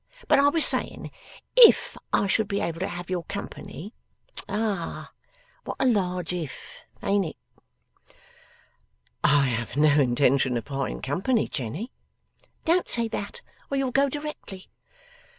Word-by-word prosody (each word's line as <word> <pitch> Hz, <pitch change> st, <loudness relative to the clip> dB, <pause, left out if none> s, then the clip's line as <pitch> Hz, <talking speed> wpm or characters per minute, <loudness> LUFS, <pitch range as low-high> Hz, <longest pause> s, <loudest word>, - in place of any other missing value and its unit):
But -, -, +5 dB
I 285 Hz, +1 st, +5 dB
was 320 Hz, +1 st, +4 dB
saying -, -, 0 dB, 0.4 s
If -, -, +7 dB, 0.2 s
I -, -, +2 dB
should 205 Hz, +2 st, +1 dB
be 200 Hz, 0 st, -1 dB
able 165 Hz, -1 st, -3 dB
to 190 Hz, -, -1 dB
have 175 Hz, +1 st, -7 dB
your 180 Hz, -2 st, 0 dB
company. 200 Hz, 0 st, -7 dB, 0.6 s
Ah! 205 Hz, -4 st, -3 dB, 0.5 s
What -, -, -6 dB
a -, -, +2 dB
large 180 Hz, -7 st, 0 dB
If! 165 Hz, -6 st, -7 dB, 0.2 s
Ain't 200 Hz, 0 st, +2 dB
it?' 160 Hz, -, -16 dB, 1.1 s
'I 145 Hz, -1 st, +5 dB
have 120 Hz, +1 st, -3 dB
no 150 Hz, 0 st, +5 dB
intention 130 Hz, 0 st, +2 dB
of 115 Hz, -, -5 dB
parting 135 Hz, -1 st, -4 dB
company, 195 Hz, -, 0 dB
Jenny.' 145 Hz, -, -5 dB, 0.7 s
'Don't 345 Hz, +2 st, +2 dB
say 235 Hz, -1 st, +2 dB
that, 205 Hz, -2 st, -5 dB, 0.3 s
or 275 Hz, -, -1 dB
you'll 270 Hz, -2 st, 0 dB
go 275 Hz, +2 st, +3 dB
directly. 290 Hz, -10 st, -7 dB
190 Hz, 135 wpm, -26 LUFS, 145-235 Hz, 1.1 s, If